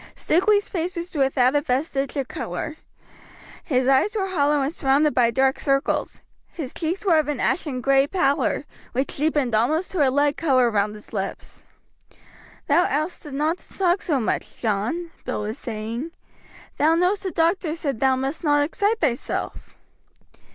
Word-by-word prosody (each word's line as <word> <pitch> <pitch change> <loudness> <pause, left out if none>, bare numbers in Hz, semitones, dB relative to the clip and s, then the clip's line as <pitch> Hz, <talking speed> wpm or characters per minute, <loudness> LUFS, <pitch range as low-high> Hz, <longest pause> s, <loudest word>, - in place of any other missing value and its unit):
Stukeley's 405 +5 +2
face 360 0 -3
was 345 +2 -5
without 270 -2 +2
a 290 - +3
vestige 275 +1 -1
of 270 -2 -1
color; 305 +4 -5 0.9
his 255 -6 +1
eyes 270 +11 +3
were 385 -2 -1
hollow 295 -5 +2
and 280 +4 -2
surrounded 285 0 +2
by 240 -2 +4
dark 265 +3 +1
circles; 275 -1 0 0.3
his 285 -7 -7
cheeks 345 +5 -3
were 335 -5 +5
of 305 - -1
an 295 -4 -2
ashen 270 -5 -1
gray 275 +1 +3
pallor, 285 -4 +1 0.3
which 265 +3 -2
deepened 290 -4 +1
almost 300 +11 +1
to 370 - -3
a 275 - +5
lead 285 +2 +1
color 255 -7 +3
round 210 0 0
his 210 - -14
lips. 195 -2 -5 1.0
"Thou 330 +5 +3
ought'st 300 +1 -3
not 305 +5 0
to - - -15
talk 370 0 +2
so 295 -6 0
much, 225 - -3
John," 235 - -1
Bill - - -3
was 215 +5 -5
saying. 230 +5 -5 0.7
"Thou 315 +2 +4
know'st 360 +4 +2
the 385 - -2
doctor 330 -1 +1
said 280 -8 -3
thou 265 0 +3
must 270 +6 -3
not 290 -2 +3
excite 410 +8 0
thyself." 255 -7 -2
290 Hz, 165 wpm, -23 LUFS, 260-335 Hz, 1.0 s, were